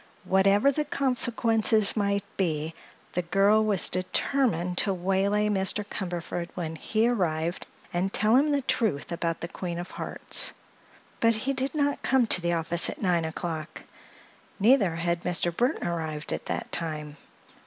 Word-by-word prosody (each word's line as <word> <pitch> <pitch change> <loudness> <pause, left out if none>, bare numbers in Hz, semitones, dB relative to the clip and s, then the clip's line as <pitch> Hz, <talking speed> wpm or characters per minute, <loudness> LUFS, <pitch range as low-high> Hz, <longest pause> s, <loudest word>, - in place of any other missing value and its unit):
Whatever 195 +7 +3
the 300 +2 -1
consequences 230 -6 +2
might 200 -2 0
be, 160 -4 -1 0.4
the 180 - 0
girl 195 +5 +3
was 205 -4 +2
determined 185 -1 0
to 200 - +2
waylay 195 +3 +1
Mr. 205 0 0
Cumberford 175 -3 -5
when 165 -3 -4
he 220 +7 0
arrived 170 -7 -1 0.3
and 185 +2 0
tell 215 +4 +3
him 285 +4 +4
the 285 -2 0
truth 210 - -1
about 170 -1 -2
the 170 - -3
Queen 175 -1 -5
of 175 +1 -6
Hearts. - - -1 0.7
But 230 0 +4
he 260 +6 -1
did 270 +3 -1
not 285 -1 0
come 265 -2 +3
to 185 - +4
the 170 0 0
office 170 +1 +1
at - - -7
nine 175 -4 +1
o'clock. 160 -1 -5 0.8
Neither 205 -5 +4
had 170 +1 -1
Mr. 175 -1 0
Burthon 245 +6 0
arrived 160 -3 -3
at - - -5
that - - -4
time. 150 -3 -4
190 Hz, 155 wpm, -27 LUFS, 170-220 Hz, 0.8 s, him